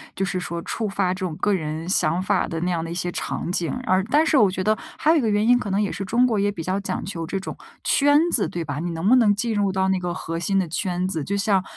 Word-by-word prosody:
就 195 - -1
是 185 -1 -2
说 170 -1 -4
触 220 +5 -3
发 195 -2 0
这 185 - -8
种 165 -4 -4
个 205 - +1
人 160 -1 -3
想 175 -2 +2
法 195 0 +1
的 165 - -4
那 180 +1 0
样 165 -2 -1
的 165 - -6
一 - - -4
些 175 0 -2
场 175 - -3
景， 175 -2 -1
而 185 -2 +2
但 300 +4 +4
是 310 - +3
我 205 -6 +5
觉 185 0 -3
得 215 +2 +2 0.2
还 310 - +3
有 330 - +4
一 - - +2
个 225 - 0
原 210 0 +2
因， 245 +1 +5
可 210 - -4
能 195 +2 +1
也 205 - -1
是 195 - -5
中 235 +6 +3
国 225 -4 +1
也 205 +1 +1
比 170 -5 -6
较 185 +4 -1
讲 200 - -4
究 170 -4 -4
这 195 +3 -2
种 190 - -6 0.3
圈 290 +1 +4
子， 220 - +3
对 170 - -4
吧？ 145 -3 -4
你 175 +2 -3
能 165 +3 -2
不 250 - +6
能 225 -5 +5
进 225 +3 -1
入 205 -2 +1
到 190 0 0
那 190 -1 +1
个 175 -1 -3
核 165 0 -4
心 195 +3 0
的 190 -2 +1
圈 180 +1 -1
子， 165 -6 -2
就 200 +8 -2
像 200 -2 +2
190 Hz, 325 characters per minute, -23 LUFS, 175-205 Hz, 0.3 s, 不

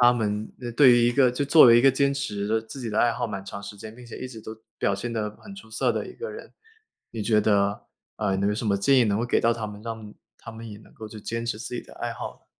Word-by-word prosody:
他 120 0 +7
们 105 -2 -2 0.2
对 140 -4 +8
于 120 0 +4
一 - - +1
个 130 -1 +4
就 125 +4 -2
作 155 +2 +8
为 120 -1 +8
一 - - +5
个 135 +1 +6
坚 140 +1 +1
持 110 -4 -2
自 140 - -8
己 120 -4 -4
的 105 - -1
爱 120 - +4
好 120 0 -2
蛮 100 -3 -5
长 100 +1 -8
时 100 +1 -8
间， 110 +2 -10
并 125 - -12
且 120 - -9
一 130 - -6
直 115 - -10
都 110 - -7 0.2
表 100 - +1
现 115 +5 -4
得 110 -2 -2
很 200 -1 -11
出 110 - -13
色 110 - +1
的 - - -2
一 - - -9
个 465 0 -6
人， 440 +3 -10 0.6
你 110 -2 -5
觉 105 0 +3
得， 100 -1 +1 0.3
呃， 95 0 0
能 100 +1 +1
有 105 - 0
什 110 0 -3
么 100 -1 +2
建 130 +7 +4
议 120 - +5
能 100 -1 +1
够 120 - 0
给 120 - +1
到 115 - +3
他 110 -2 -4
们， 105 0 -9
让 110 -2 -7 0.2
他 115 - -10
们 115 0 -9
也 105 - -9
能 - - -19
够 110 -1 -9
就 110 - -10
坚 115 +2 -4
持 110 -2 -2
自 125 - -6
己 - - -3
的 - - -15
爱 - - -4
好 - - -6
呢？ - - -31
115 Hz, 325 characters per minute, -25 LUFS, 105-120 Hz, 0.6 s, 对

